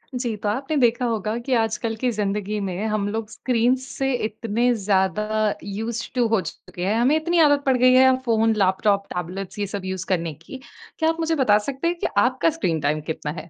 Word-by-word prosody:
जी। 240 -3 -2
तो 205 - +1
आपने 275 +7 -2
देखा 240 -1 +2
होगा 220 -2 -1
कि 245 +2 -3
आजकल 225 0 -2
की 250 - +3
ज़िंदगी 210 0 -2
में 185 +4 -3
हम 210 -2 -1
लोग 220 0 -4
स्क्रीन 245 0 +1
से 270 0 -2
इतने 230 +2 0
ज़्यादा 195 0 0 0.4
यूस्ड 225 +3 -5
टु 245 -1 +3
हो 225 -2 +2
चुके 180 +1 -7
हैं 205 +3 +1
हमें 260 +6 +3
इतनी 340 +2 +1
आदत 290 -2 +4
पड़ 265 -1 +3
गई 255 +1 +5
है 260 0 +6
फ़ोन, 225 -1 +2
लेपटॉप, 200 0 +2
टेबलेट्स 180 +3 -5
ये 205 - -1
सब 195 -2 -5
यूस 185 -1 -3
करने 165 -3 -2
की। 165 - -11 0.4
क्या 320 0 +3
आप 325 0 -2
मुझे 325 0 0
बता 210 -4 +5
सकते 275 +4 -2
हैं 345 +1 -1
कि - - 0
आपका 255 +8 +3
स्क्रीन 185 - -1
टाइम 150 +2 0
कितना 150 -1 -4
है? 170 - -16
225 Hz, 210 wpm, -23 LUFS, 195-255 Hz, 0.4 s, है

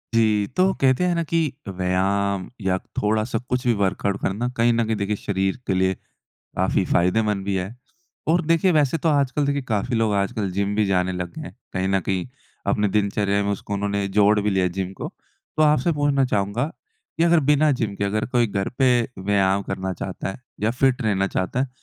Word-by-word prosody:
जी। 105 -3 +3
तो 190 +1 +4
कहते 130 +5 +3
हैं 180 -1 +2
ना 170 - 0
कि 165 +1 0 0.3
व्यायाम 95 +1 0
या 95 -1 +1 0.2
थोड़ा-सा 110 +3 0
कुछ 125 0 -1
भी 120 - +4
वर्कआउट 100 +1 0
करना 105 +6 -1
कहीं 120 +1 +4
न 115 0 +2
कहीं 110 0 0
देखिए 100 0 -1
शरीर 95 -1 -1
के 95 - +1
लिए 95 0 +2 0.6
काफ़ी - - +1
फ़ायदेमंद 95 +3 +2
भी 100 0 -1
है। 95 +4 -3 0.5
और 170 +2 +3
देखिए 165 +3 +3
वैसे 150 0 +2
तो 160 - 0
आजकल 145 -1 +1
देखिए 140 0 0
काफ़ी 110 +2 0
लोग 110 -2 +1
आजकल 100 0 -1
जिम 100 +2 -1
भी 105 -1 +2
जाने 95 -1 +1
लग 90 -1 -4
गए 160 - -7
हैं। - - -11 0.2
कहीं 95 0 -1
न 95 0 +2
कहीं 95 0 -2 0.4
अपने 105 +1 +2
दिनचर्या 100 0 +1
में 100 - 0
उसको 100 0 -5
उन्होंने 100 0 -1
जोड़ 105 +2 +4
भी 105 +1 0
लिया 95 -1 +2
है 90 - +1
जिम 95 0 -3
को। - - -3 0.5
तो 155 - +3
आपसे 150 +2 +3
पूछना 145 -2 +2
चाहूँगा 105 +2 0 0.5
कि 165 - +4
अगर 170 -1 +5
बिना 150 +1 +4
जिम 115 -6 -2
के 100 - -1
अगर 105 +2 -1
कोई 120 -1 +2
घर 100 -2 -2
पे 125 -3 +4 0.2
व्यायाम 100 0 +1
करना 95 -1 -3
चाहता 95 +1 -5
है 95 - -9 0.2
या 105 +2 +2
फिट 135 -1 +3
रहना 100 -3 +1
चाहता 100 +5 -2
है 135 - 0
105 Hz, 205 wpm, -23 LUFS, 95-125 Hz, 0.6 s, अगर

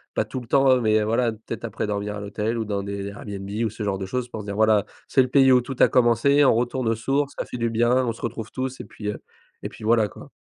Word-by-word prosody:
pas - - +1
tout 130 - -5
le 120 - -11
temps, 135 0 +4
heu, - - -2
mais 110 -1 +3
voilà, 115 +2 +1
peut-être 110 +1 -8
après 110 -1 -3
dormir 105 0 -3
à - - -5
l'hôtel 105 +3 -3
ou 110 - -2
dans 100 -1 -2
des 100 0 -5
Airbnb 100 -1 -7 0.2
ou 110 - +1
ce 110 0 -7
genre 100 -1 -1
de 95 - -4
choses. 125 +2 -3
Pour 110 -3 -7
se - - -10
dire, 100 - -4
voilà, 110 -1 +4 0.2
c'est 135 - +4
le 130 - +1
pays 135 0 +5
où 125 -1 +6
tout 130 +2 -6
a - - +8
commencé. 125 +4 +4
On 130 - +5
retourne 120 +1 -1
aux 115 - +1
sources, 140 +5 -1
ça - - -3
fait 125 - -7
du 115 0 0
bien. 120 +2 +2
On - - +1
se 115 - -11
retrouve 115 -2 -4
tous 130 0 -4
et - - -7
puis, 105 -1 -6
heu, 105 - -4 0.4
et - - -5
puis, - - -13
voilà, 110 -1 +3
quoi. - - -13
115 Hz, 295 wpm, -24 LUFS, 105-125 Hz, 0.4 s, a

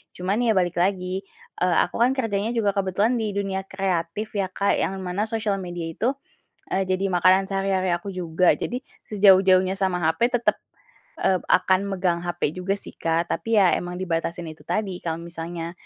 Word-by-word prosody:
Cuman 190 +4 -1
ya 235 -3 +2
balik 175 -2 +1
lagi, 185 +1 -1 0.3
eee, 180 -1 +2
aku 175 - -5
kan 250 +3 +3
kerjanya 225 -2 -1
juga 210 -3 +2
kebetulan 200 +5 +1
di 215 -3 -2
dunia 195 -1 -2
kreatif 190 +1 -2
ya, 200 -2 -1
Kak, 200 +2 0
yang 195 - -1
mana 185 +4 -2
sosial 215 -3 -1
media 175 -2 -5
itu, 240 - -1 0.6
eee, 195 - +2
jadi 190 +1 0
makanan 185 +2 +4
sehari-hari 195 -2 0
aku 175 +3 -5
juga, 180 -1 +1
jadi 250 +2 -3 0.3
sejauh-jauhnya 190 -2 +5
sama 185 -3 0
hape 160 +9 +2
tetap, 240 - 0 0.6
eee, 185 -1 +2
akan 185 +1 +4 0.2
megang 175 -2 +1
hape 175 -4 -1
juga 185 +3 -2
sih, - - -7
Kak, 165 +1 0
tapi 225 +6 0
ya 185 -3 +5
emang 175 0 -5
dibatasin 170 -1 -2
itu 155 - -17
tadi, 195 -4 -2
kalau 165 -1 -1
misalnya 170 0 -6
190 Hz, 175 wpm, -24 LUFS, 175-200 Hz, 0.6 s, sejauh-jauhnya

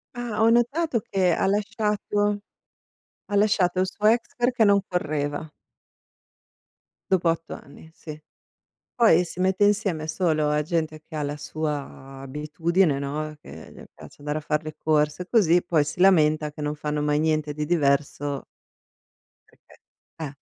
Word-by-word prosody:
Ah. 240 -3 -4
Ho 225 - +5
notato 240 +4 +2
che 185 -3 +2
ha - - 0
lasciato 205 0 0 0.9
ha 205 - -2
lasciato 200 -3 +2
il 185 - +2
suo 205 +3 -2
ex 230 +2 +2
perché 245 -1 +2
non 200 -1 +5
correva. 150 -3 -2 1.6
Dopo 180 -3 +3
8 165 0 -2
anni, 150 +3 -13
sì. 155 -2 -10 0.7
Poi 195 -8 +5
si 175 +1 -8
mette 190 +2 +2
insieme 200 -6 +1
solo 155 -2 0
a 150 0 +1
gente 160 -1 -2
che 155 - -10
ha 150 - -2
la 145 +1 -3
sua 145 -3 -5
abitudine, 150 +3 0
no, 150 +2 -4
che 80 - -12
le - - -13
piace - - -14
andare 150 +1 -3
a - - -6
far 150 0 -1
le 155 -1 -8
corse 155 +3 0
così, 180 -7 +4
poi 165 -3 +1
si 145 +4 -5
lamenta 155 -5 +4
che 150 - -8
non 150 0 -2
fanno 150 0 -2
mai 150 0 +1
niente 155 -1 0
di 150 +1 -4
diverso 145 -3 0 1.0
Perchè, - - -23 0.4
eh. 150 -3 -5
160 Hz, 150 wpm, -24 LUFS, 150-195 Hz, 1.6 s, Ho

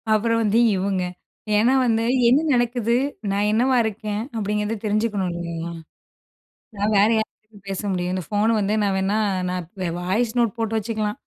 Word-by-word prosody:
அப்புறம் 230 +2 +2
வந்து 215 +2 +3 0.2
இவங்க 190 0 -1 0.6
ஏன்னா 235 +5 +4
வந்து 225 -1 +2 0.2
என்ன 260 +5 +5
நடக்குது 240 -1 +1 0.4
நான் 200 +1 +1
என்னவா 250 +4 +2
இருக்கேன் 215 -1 -3
அப்படிங்கிறத 210 0 -1
தெரிஞ்சுக்கணும் 210 -3 0
இல்லயா? 170 -1 -5 1.1
நான் 205 +2 0
வேற 205 +2 +5
யார்கிட்ட 215 -1 -7
பேச 195 -1 -3
முடியும் 180 -1 -2
இந்த 185 -2 -3
ஃபோன் 210 +2 +1
வந்து 205 0 0
நான் 200 -1 +1
வேணா 195 +3 0 0.3
நான் 180 -2 -3 0.3
வாய்ஸ் 215 +6 0
நோட் 235 -3 +2
போட்டு 225 -1 -1
வச்சுக்கலா 215 -1 -2
210 Hz, 150 wpm, -22 LUFS, 195-225 Hz, 1.1 s, என்ன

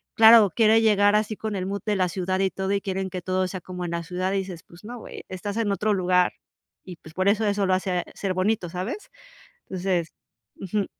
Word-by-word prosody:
claro 220 -2 +8
quiere 225 -1 +5
llegar 205 -2 +4
así 215 0 0
con 215 0 -4
el 185 - -3
mood 200 +1 -3
de 210 -2 0
la 185 -1 +2
ciudad 185 +1 -2
y 190 -1 +1
todo, 190 0 -3
y 200 - +1
quieren 190 -1 -3
que 185 -1 -5
todo 185 +1 0
sea 185 - -5
como 180 0 -7
en 170 - -4
la 170 0 -2
ciudad 180 +2 -2
y - - +1
dices, 185 -3 -7
pues, 170 +2 -17
no 245 +2 -7
güey - - -10
estás 200 +3 -5
en 215 -3 0
otro 210 +1 +1
lugar 180 -1 +2 0.5
y 180 -2 -8
pues, 160 - -15
por 185 +3 0
eso, 215 +2 +2
eso 200 -1 +1
lo 185 - +3
hace 185 -1 -1
ser 190 -2 -2
bonito 185 -1 0
¿sabes? 185 - -5 0.6
Entonces 180 -3 -1 0.4
Ujú. 195 +1 -2
190 Hz, 230 wpm, -25 LUFS, 185-210 Hz, 0.6 s, claro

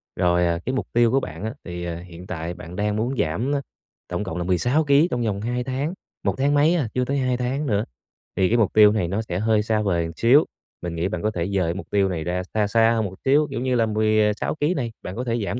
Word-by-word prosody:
Rồi, 90 -1 +2
ờ, 85 0 0
cái 130 - -1
mục 130 - -2
tiêu 120 -1 +4
của 135 - +3
bạn 80 -7 -7
á 110 +1 -3
thì, 85 -1 -6
ờ, 85 -1 -3
hiện 90 0 -11
tại 85 -1 -4
bạn 85 0 -10
đang 105 +2 0
muốn 120 +5 -1
giảm, 110 - 0
a, 140 - -1 0.5
tổng - - -3
cộng 80 - -5
là 90 - -2
16 120 - +2
ký 145 +2 +4
trong 125 - -1
vòng 100 -3 -1
2 120 +3 -2
tháng 135 +6 -2 0.3
một - - 0
tháng 140 +2 +2
mấy 150 +4 +4
à, 150 -9 0
chưa 125 0 0
tới 140 +2 -1
2 130 -2 +1
tháng 130 +4 -2
nữa, 105 -3 +1 0.5
thì 95 - +3
cái 120 - +3
mục 110 -5 +2
tiêu 105 -1 +7
này 105 -5 0
nó 100 +5 -1
sẽ 90 -5 -4
hơi 110 0 +2
xa 110 0 +1
vời 85 -5 0
một 85 - -8
xíu. 130 +6 +6 0.4
Mình 85 -1 -4
nghĩ 85 +2 0
bạn 110 - -4
có 110 - +1
thể 85 -5 -2
rời 95 -1 0
cái 85 - 0
mục 95 - -7
tiêu 100 -2 +2
này 85 -4 -3
ra 90 +2 -1
xa 105 -1 +2
xa 115 +2 +4
hơn 110 -2 0
một 95 -1 -6
xíu, 145 +3 +4
kiểu - - -3
như 130 -1 0
là, 115 -2 +3
16 110 0 +1
ký 155 +3 +1
này 125 -8 -2
bạn 90 - -7
có 125 - -3
thể 120 -2 -1
giảm 120 - -3
110 Hz, 280 wpm, -23 LUFS, 90-125 Hz, 0.5 s, tiêu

